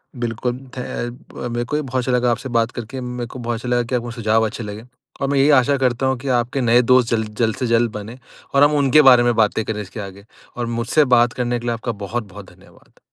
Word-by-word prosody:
बिल्कुल 120 0 -3 0.2
धे 125 - -4
अ, 120 0 -6
मेरे 120 0 -2
को 145 - -3
भी 150 - +1
बहुत 130 -3 -4
अच्छा 130 - -1
लगा 125 -1 +2
आपसे 125 +3 -3
बात 115 0 +1
करके। 120 +3 -7
मेरे 125 -1 -5
को 130 - -10
बहुत 120 -1 -2
अच्छा 120 +2 -6
लगा 120 0 +2
कि 125 +2 -3
आपको 120 -1 -3
सुझाव 110 -1 +1
अच्छे 110 +2 -5
लगे। 105 +2 -8 0.4
और 140 - 0
मैं 140 - +1
यही 140 +2 +4
आशा 140 +3 +1
करता 130 -1 0
हूँ 130 0 +1
कि 140 - -8
आपके 125 +3 -2
नए 120 +1 +4
दोस्त 125 -1 +3
जल्द 110 -2 -1
जल्द 110 -2 +1
से 125 - -2
जल्द 115 0 +2
बनें 105 +3 -8 0.4
और 140 - +6
हम 145 +1 +4
उनके 140 +1 +5
बारे 125 -4 +7
में 120 0 +2
बातें 110 0 +2
करें 105 -1 -3
इसके 105 +2 -9
आगे 100 0 -9 0.3
और 120 - -2
मुझसे 145 +6 +2
बात 120 0 +3
करने 120 -1 -1
के 120 - -9
लिए 120 - 0
आपका 115 +1 -3
बहुत-बहुत 105 -3 -6
धन्यवाद। - - -22
120 Hz, 250 wpm, -20 LUFS, 115-125 Hz, 0.4 s, बारे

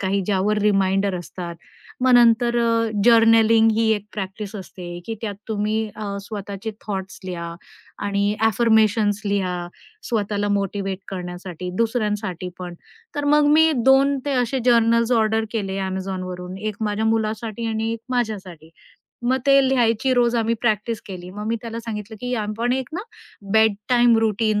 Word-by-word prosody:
काही, 195 +1 0
ज्यावर 205 +1 +1
रिमाइंडर 195 -1 +2
असतात. 175 0 -7 0.5
मग 255 0 +4
नंतर 240 0 +5
अ, 230 -1 +1
जर्नलिंग 225 -1 +6
ही 225 +1 +1
एक 205 -1 -5
प्रॅक्टिस 200 +1 -6
असते 175 -2 -8
की 225 - -3
त्यात 210 -3 -3
तुम्ही 215 0 0 0.2
अ, 200 -2 -4
स्वतःचे 205 +1 -6 0.2
थॉट्स 195 -1 -4
लिहा 170 -2 -5 0.5
आणि 200 +1 0
ॲफर्मेशन्स 220 -1 +3
लिहा, 180 -3 -1 0.4
स्वतःला 205 -2 -1
मोटिव्हेट 195 -1 -1
करण्यासाठी, 180 -1 -6
दुसऱ्यांसाठी 210 -5 -1
पण. 180 -1 -6 0.4
तर 290 0 -2
मग 295 +1 +4
मी 320 +1 +6
2 270 +1 +5
ते 285 - -2
असे 255 +3 -1
जर्नल्स 230 0 +4
ऑर्डर 220 -1 +2
केले 195 -4 -3
Amazonवरून, 185 -1 -5
1 215 0 -4
माझ्या 210 0 -1
मुलासाठी 220 0 -1
आणि 225 0 -1
1 230 - -5
माझ्यासाठी. 195 -10 -3 0.5
मग 255 +2 +2
ते 275 0 +6
लिहायची 245 0 +2
रोज 240 -1 +3
आम्ही 230 0 +1
प्रॅक्टिस 220 -1 0
केली. 180 -2 -8
मग 210 +2 -6
मी 230 +1 0
त्याला 230 0 -5
सांगितलं 220 -1 -6
की, 250 0 -2
"आपण 220 +2 -1
एक 260 -1 -2
ना 355 - -3 0.5
बेड 220 -1 +5
टाईम 240 -2 +5
रूटीन 215 -1 +1
215 Hz, 150 wpm, -22 LUFS, 195-230 Hz, 0.5 s, जर्नलिंग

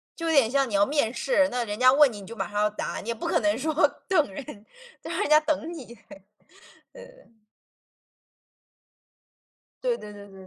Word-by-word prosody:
就 330 -1 -5
有 - - +1
点 270 -7 +4
像 270 -1 +1
你 - - -8
要 200 0 +4
面 280 -5 0
试， 275 +4 +2
那 245 -1 -2
人 210 -1 -5
家 255 0 +6
问 285 -1 +5
你， 205 -2 -9
你 195 - -12
就 230 - -9
马 195 - -4
上 205 0 -3
要 210 - +2
答， 210 - -5
你 230 - -8
也 - - 0
不 220 - -7
可 - - +2
能 210 -1 +1
说 310 +4 -2 0.3
等 310 - +2
人， 270 - -7 0.6
就 - - -7
让 - - -3
人 - - -1
家 305 - +7
等 310 +2 -2
你。 285 -7 -9
对 205 -4 -15 0.7
对 - - -12
对。 235 - -22 2.4
对 - - 0
对 210 - -11
对 205 0 -12
对 190 -1 -14
245 Hz, 230 characters per minute, -25 LUFS, 210-300 Hz, 2.4 s, 家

